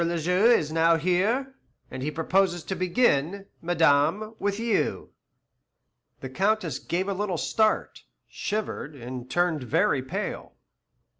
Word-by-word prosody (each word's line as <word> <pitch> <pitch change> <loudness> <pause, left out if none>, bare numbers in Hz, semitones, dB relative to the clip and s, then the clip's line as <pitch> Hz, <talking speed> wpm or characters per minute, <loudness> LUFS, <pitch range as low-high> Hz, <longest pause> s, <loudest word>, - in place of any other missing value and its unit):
le 170 0 -1
Juge 180 +9 +4
is 155 -1 -3
now 165 +1 +4
here, 200 - 0 0.4
and 130 - -6
he 145 - -1
proposes 175 +2 +1
to 190 - -4
begin, 185 - +1 0.2
madame, 165 +5 +2
with 200 +1 -1
you." 230 -2 -1 1.1
The 130 - -6
Countess 215 +8 0
gave 185 +3 -2
a 200 - -1
little 190 -2 -2
start, 215 +6 0 0.2
shivered, 205 -8 -4
and 125 0 -8
turned 175 -2 +1
very 125 +2 +1
pale. 130 - -5
175 Hz, 130 wpm, -26 LUFS, 155-200 Hz, 1.1 s, Juge